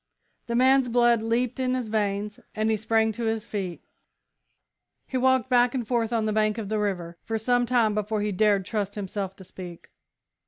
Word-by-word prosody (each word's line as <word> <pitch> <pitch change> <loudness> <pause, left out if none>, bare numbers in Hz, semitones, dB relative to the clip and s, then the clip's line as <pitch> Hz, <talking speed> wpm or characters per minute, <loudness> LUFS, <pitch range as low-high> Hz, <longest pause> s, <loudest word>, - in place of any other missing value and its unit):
The 235 - -2
man's 260 +1 +4
blood 240 -1 +4
leaped 230 +3 -1
in 255 0 +1
his 250 -4 -3
veins, 205 -1 -1 0.2
and 215 0 +1
he - - +3
sprang 220 +1 +1
to 235 +2 -4
his 220 -1 -1
feet. 190 -6 -5 1.2
He - - -8
walked 260 -1 +3
back 245 0 +3
and 240 -4 -2
forth 235 -2 0
on 225 -2 +1
the 215 - 0
bank 215 0 +1
of 215 -3 -4
the 215 0 0
river 175 -5 -3
for 225 - -2
some 245 +2 +1
time 230 -3 +3
before 210 0 -1
he 210 0 -1
dared 200 -1 +2
trust 205 -1 -3
himself 195 -1 -4
to 190 - -13
speak. 180 -2 -10
220 Hz, 195 wpm, -26 LUFS, 205-240 Hz, 1.2 s, man's